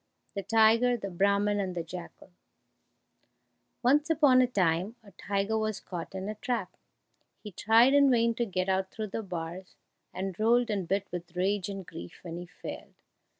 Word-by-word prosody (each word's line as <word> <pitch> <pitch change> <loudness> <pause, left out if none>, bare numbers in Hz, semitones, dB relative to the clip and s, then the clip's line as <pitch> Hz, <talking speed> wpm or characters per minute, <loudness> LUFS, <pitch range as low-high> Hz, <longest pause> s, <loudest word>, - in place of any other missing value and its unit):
The 200 - -3
Tiger, 225 +3 +4
the 200 -3 -6
Brahman, 200 +3 +2
and 185 -2 -2
the 170 - -2
Jackal 175 +2 -10 1.5
Once 290 +5 +3
upon 290 -5 +5
a 250 - +3
time, 185 -1 0
a 200 - -16
tiger 200 +4 -1
was 215 -1 -2
caught 175 0 -7
in 190 +1 -4
a 215 - -3
trap. 240 +3 -3 0.7
He 210 - -7
tried 225 +7 +4
in 285 -1 +6
vain 230 -2 +3
to 235 +1 -1
get 185 -1 -2
out 190 0 0
through 215 0 -5
the 225 - -3
bars, 180 -1 -7 0.4
and 190 0 -5
rolled 235 +1 +3
and 195 -4 -2
bit 195 +2 0
with 175 0 -7
rage 195 +2 0
and 195 -2 -6
grief 85 - -10
when 170 -1 -6
he 175 0 -7
failed. 190 - -9
200 Hz, 175 wpm, -29 LUFS, 185-230 Hz, 1.5 s, in